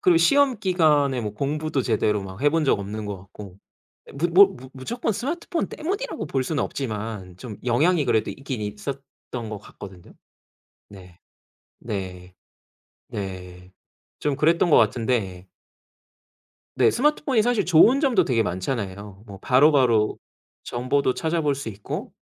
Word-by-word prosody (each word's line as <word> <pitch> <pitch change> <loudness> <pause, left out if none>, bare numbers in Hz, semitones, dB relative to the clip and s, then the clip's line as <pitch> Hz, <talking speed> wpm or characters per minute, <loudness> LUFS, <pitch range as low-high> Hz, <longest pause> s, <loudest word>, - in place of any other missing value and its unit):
그리고 365 -5 +4
시험 280 -6 +4
기간에 150 -9 +2
뭐 105 -2 -4
공부도 150 +2 -2
제대로 105 -3 0
막 95 +3 -9
해 145 - +5
본 160 0 +1
적 135 - +2
없는 105 +2 -5
것 100 - -4
같고. 95 0 -12 0.5
예 - - -12
무 160 +6 -1
뭐 195 +3 +9
무 130 +1 -12
무조건 225 - -3
스마트폰 335 - -3
때문이라고 395 +11 -4
볼 130 -1 -1
수는 150 +1 -1
없지만 105 -7 -5
좀 110 -3 -8
영향이 150 +7 +2
그래도 110 -4 +1
있긴 135 -4 -6
있었던 105 +7 -5 0.5
것 105 - -5
같거든요. 95 -2 -13 0.8
네. 90 -3 -14 0.6
네. 95 -4 -6 0.7
네. 90 -2 -7 0.5
좀 145 -2 -1
그랬던 165 +3 +3
것 - - +6
같은데 105 -5 0 1.3
네. - - +5
스마트폰이 275 -3 +1
사실 240 -2 +1
좋은 185 - +6
점도 245 - +3
되게 120 -3 +1
많잖아요. 100 0 -4
뭐 100 -2 -9
바로바로 130 -5 +4 0.5
정보도 130 +2 0
찾아볼 160 -2 0
수 135 -4 -5
있고 100 -1 -6
130 Hz, 285 characters per minute, -24 LUFS, 105-165 Hz, 1.3 s, 뭐